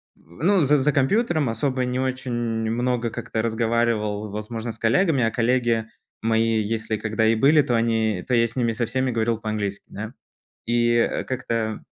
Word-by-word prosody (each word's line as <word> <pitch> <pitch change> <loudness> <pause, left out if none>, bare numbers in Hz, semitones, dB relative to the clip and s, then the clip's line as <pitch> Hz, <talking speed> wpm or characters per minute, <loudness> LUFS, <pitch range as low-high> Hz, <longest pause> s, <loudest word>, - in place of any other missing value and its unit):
з - - -28 0.2
ну, 190 -4 +4
з 150 +2 +4
за 150 +3 +2
компьютером, 155 - +1
особо 130 +3 -1
не 125 +1 -2
очень 130 -1 -2
много 120 +1 -1
как-то 110 0 -3
разговаривал, 110 -2 0
возможно, 110 +2 -5
с 110 - -12
коллегами, 140 - +2
а 115 - +1
коллеги 120 -1 +1 0.3
мои 115 0 +2
если 110 +1 -2
когда 110 +1 -1
и 115 +1 +4
были, 145 +6 +5
то 125 -3 0
они 110 -4 +1
то 125 - -1
я 115 -1 +4
с 115 - -11
ними 120 -3 +1
со 115 +1 -1
всеми 130 +1 -1
говорил 115 0 0
по-английски, 105 -3 -3
да. 110 +3 -7 0.5
И, 120 0 +2
э, 115 - +1
как-то 115 -4 -3
115 Hz, 175 wpm, -23 LUFS, 110-125 Hz, 0.5 s, были